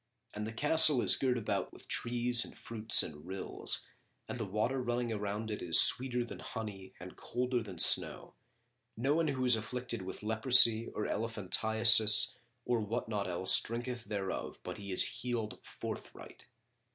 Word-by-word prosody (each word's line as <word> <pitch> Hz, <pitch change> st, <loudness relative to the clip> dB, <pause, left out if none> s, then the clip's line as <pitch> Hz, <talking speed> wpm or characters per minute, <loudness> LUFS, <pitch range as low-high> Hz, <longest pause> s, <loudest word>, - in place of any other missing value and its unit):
And 105 Hz, +1 st, -6 dB
the -, -, -6 dB
Castle 150 Hz, +3 st, +4 dB
is -, -, +4 dB
girt 125 Hz, -2 st, -1 dB
about 100 Hz, -4 st, -4 dB
with -, -, -17 dB
trees 120 Hz, 0 st, +2 dB
and -, -, -10 dB
fruits 110 Hz, -1 st, +3 dB
and 75 Hz, -1 st, -10 dB
rills, 95 Hz, +1 st, -4 dB, 0.4 s
and -, -, -7 dB
the 110 Hz, -, -4 dB
water 110 Hz, +7 st, -2 dB
running 120 Hz, -1 st, -3 dB
around 105 Hz, +1 st, -5 dB
it 105 Hz, -, -6 dB
is 80 Hz, -2 st, +5 dB
sweeter 125 Hz, -1 st, +4 dB
than -, -, -10 dB
honey 100 Hz, -4 st, -9 dB
and 90 Hz, 0 st, -11 dB
colder 125 Hz, 0 st, -3 dB
than 100 Hz, -5 st, -10 dB
snow: -, -, 0 dB, 0.6 s
none 145 Hz, +7 st, 0 dB
who 130 Hz, -3 st, -3 dB
is 125 Hz, -2 st, +5 dB
afflicted 120 Hz, 0 st, -6 dB
with 95 Hz, +2 st, -9 dB
leprosy 115 Hz, 0 st, +4 dB
or 105 Hz, -, -6 dB
elephantiasis[FN#40] 110 Hz, 0 st, +4 dB, 0.3 s
or 120 Hz, -1 st, -1 dB
what 110 Hz, +2 st, -5 dB
not 105 Hz, -3 st, -3 dB
else 90 Hz, +1 st, +2 dB
drinketh 120 Hz, +1 st, -6 dB
thereof 95 Hz, -2 st, -5 dB
but -, -, -8 dB
he 100 Hz, -1 st, -8 dB
is 90 Hz, -, +5 dB, 0.2 s
healed 115 Hz, -3 st, -5 dB
forthright. -, -, -10 dB
110 Hz, 160 wpm, -31 LUFS, 105-125 Hz, 0.6 s, is